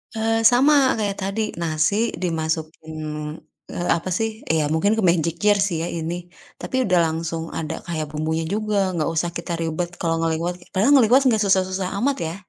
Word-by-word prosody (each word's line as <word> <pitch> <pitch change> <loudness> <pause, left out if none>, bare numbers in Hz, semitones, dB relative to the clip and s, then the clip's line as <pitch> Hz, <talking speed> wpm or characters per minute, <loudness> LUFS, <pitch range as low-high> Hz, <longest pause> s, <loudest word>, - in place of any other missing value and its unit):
Eee, 225 0 +1
sama 270 +1 +4
kayak 205 -3 -2
tadi, 195 +3 -2 0.2
nasi 170 +8 +1
dimasukin, 160 -1 -3 0.7
eee, 175 0 -4
apa 170 +2 0
sih, 225 0 0 0.2
ya 160 -1 +2
mungkin 200 +7 +2
ke 220 - -1
magic 170 -2 +2
jar 205 -1 +4
sih 175 -5 0
ya - - -2
ini, 175 +1 -5 0.3
tapi - - -4
udah 180 -2 +4
langsung 165 0 -3
ada 160 0 -4
kayak 160 -3 -3
bumbunya 160 +1 -2
juga, 200 -1 0
nggak 155 - 0
usah 170 +2 0
kita 170 0 -5
ribet 165 +1 -2
kalau 165 -1 0
ngeliwet. 165 +2 -1 0.2
Padahal 220 +10 +4
ngeliwet 255 +1 +6
enggak 220 -3 +3
susah-susah 190 -1 +1
amat 275 +2 +1
ya. 165 - -5
175 Hz, 175 wpm, -22 LUFS, 160-210 Hz, 0.7 s, ngeliwet